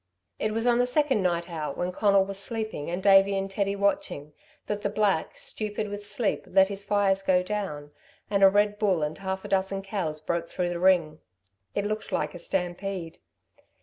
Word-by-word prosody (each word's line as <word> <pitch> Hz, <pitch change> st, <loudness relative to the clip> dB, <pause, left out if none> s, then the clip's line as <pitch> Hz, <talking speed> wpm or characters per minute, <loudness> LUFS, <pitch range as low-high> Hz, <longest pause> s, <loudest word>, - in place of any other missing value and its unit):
It 215 Hz, -, 0 dB
was 225 Hz, +2 st, -1 dB
on 240 Hz, -1 st, +4 dB
the 245 Hz, -, +3 dB
second 270 Hz, -4 st, +2 dB
night 170 Hz, -2 st, 0 dB
out 155 Hz, -5 st, -4 dB
when 180 Hz, +1 st, -1 dB
Conal 200 Hz, 0 st, +3 dB
was 195 Hz, 0 st, -4 dB
sleeping 220 Hz, -7 st, -4 dB
and 180 Hz, +2 st, -3 dB
Davey 195 Hz, 0 st, +6 dB
and 195 Hz, 0 st, -3 dB
Teddy 200 Hz, 0 st, 0 dB
watching, 195 Hz, -7 st, -1 dB, 0.3 s
that 210 Hz, 0 st, -3 dB
the 205 Hz, -, -1 dB
black, 205 Hz, -5 st, 0 dB
stupid 210 Hz, 0 st, -3 dB
with 205 Hz, 0 st, -6 dB
sleep, 205 Hz, 0 st, -2 dB
let 190 Hz, +1 st, +4 dB
his 200 Hz, 0 st, -5 dB
fires 200 Hz, -1 st, +2 dB
go 185 Hz, -2 st, +2 dB
down, 180 Hz, -8 st, -4 dB, 0.4 s
and 200 Hz, -1 st, 0 dB
a 195 Hz, -, +10 dB
red 205 Hz, +1 st, +2 dB
bull 190 Hz, -7 st, +2 dB
and 150 Hz, +1 st, -3 dB
half 190 Hz, 0 st, -4 dB
a -, -, -4 dB
dozen 195 Hz, 0 st, 0 dB
cows 185 Hz, -6 st, -3 dB
broke 170 Hz, +2 st, -2 dB
through 180 Hz, -1 st, -1 dB
the 175 Hz, -1 st, -3 dB
ring. 170 Hz, -4 st, +3 dB, 0.6 s
It 200 Hz, -, 0 dB
looked 215 Hz, +1 st, -3 dB
like 150 Hz, 0 st, -1 dB
a 175 Hz, -, -8 dB
stampede. 180 Hz, -1 st, -3 dB
195 Hz, 195 wpm, -27 LUFS, 175-205 Hz, 0.6 s, a